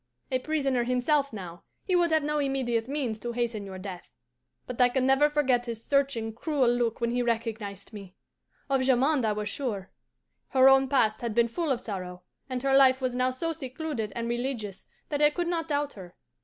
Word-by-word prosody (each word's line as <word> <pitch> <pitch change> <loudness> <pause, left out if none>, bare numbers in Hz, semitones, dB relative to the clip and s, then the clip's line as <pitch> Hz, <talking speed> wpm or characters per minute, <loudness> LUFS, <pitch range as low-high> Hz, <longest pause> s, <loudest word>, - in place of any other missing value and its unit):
A 255 - +1
prisoner 275 -4 0
himself 275 +4 +1
now, 175 -5 -8 0.2
he 370 - 0
would 345 -1 +3
have 315 -1 +3
no 300 0 0
immediate 255 -5 0
means 265 -6 -2
to 240 +2 -4
hasten 230 -4 -2
your 190 -1 -7
death. 185 -2 -8 0.6
But 250 0 -3
I 245 - +6
can 255 +1 0
never 270 +3 +4
forget 260 -5 +1
his 230 -1 -5
searching, 270 -6 0
cruel 270 +1 +1
look 240 -2 0
when 235 -1 0
he 245 +1 0
recognized 225 -4 -3
me! 195 -3 -10 0.5
Of 270 -2 +1
Jamond 260 +1 +3
I 215 - +1
was 210 0 -3
sure. 210 -9 -4 0.6
Her 260 0 +5
own 270 0 +6
past 230 -6 +2
had 235 -3 -3
been 235 0 +4
full 315 +7 -3
of 250 - +1
sorrow, 185 -5 -6 0.3
and 255 -1 -3
her 270 0 +3
life 265 -1 +6
was 255 -2 -1
now 255 +1 +1
so 325 +6 -2
secluded 265 -6 -4
and 235 0 -3
religious 240 -5 -4 0.2
that 290 -1 -1
I 295 - +7
could 345 +3 -3
not 335 -2 -1
doubt 290 -1 -1
her. 180 -3 -12
250 Hz, 200 wpm, -28 LUFS, 225-275 Hz, 0.6 s, I